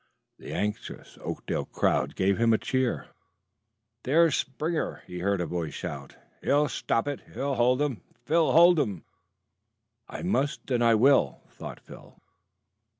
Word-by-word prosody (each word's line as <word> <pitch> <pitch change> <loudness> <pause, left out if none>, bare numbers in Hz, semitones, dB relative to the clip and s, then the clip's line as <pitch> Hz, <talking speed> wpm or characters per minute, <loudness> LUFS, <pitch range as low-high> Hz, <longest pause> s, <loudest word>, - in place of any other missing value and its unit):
The - - -9
anxious 105 +1 -4
Oakdale - - -3
crowd - - 0
gave 95 +2 +1
him 115 -1 +4
a - - +4
cheer. 130 +1 -1 0.9
"There's 160 +3 +4
Springer!" 155 +5 -2
he 90 0 -7
heard 100 +1 0
a 90 - -1
voice 85 -1 -4
shout. 70 -1 -7 0.3
"He'll 145 +1 +2
stop 115 +4 -1
it. 145 -2 -3 0.2
Hold 130 -2 +1
'em, 135 -7 -2 0.2
Phil 165 0 +3
hold 170 +1 +6
'em!" 100 - -2 1.1
"I - - -7
must, 150 -7 -1
and 120 -1 +2
I 115 -1 +5
will," 120 - +3
thought - - -9
Phil. - - -15
125 Hz, 140 wpm, -27 LUFS, 100-145 Hz, 1.1 s, hold